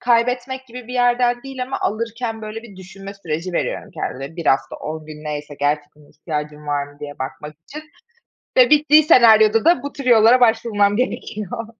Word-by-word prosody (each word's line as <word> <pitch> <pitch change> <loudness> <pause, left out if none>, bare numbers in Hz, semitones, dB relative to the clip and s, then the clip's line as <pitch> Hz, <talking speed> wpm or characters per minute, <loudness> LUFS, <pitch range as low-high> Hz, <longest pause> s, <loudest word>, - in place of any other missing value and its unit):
kaybetmek 250 +2 0
gibi 245 -1 -10
bir - - -7
yerden 245 0 +2
değil 270 -2 -6
ama 255 - -4
alırken 225 +1 -3
böyle 215 +1 -7
bir 210 -5 -14
düşünme 195 +2 -10
süreci 175 -1 -5
veriyorum - - -3
kendime. 135 +6 -6
1 170 - -6
hafta 135 - +1
10 155 0 -7
gün 155 0 -11
neyse, 150 -1 -6
gerçekten 145 0 -3
ihtiyacım 150 -1 -6
var 145 -1 -1
mı 145 - -17
diye 145 0 -8
bakmak 130 +3 -7
için 305 +2 -8 0.7
ve - - +6
bittiği 300 +1 +6
senaryoda 225 -6 +5
da 345 +2 +4
bu 285 0 -6
tür 275 - -8
yollara 240 0 +5
başvurmam 225 -3 +2
gerekiyor. 225 -3 -4
220 Hz, 175 wpm, -20 LUFS, 155-245 Hz, 0.7 s, ve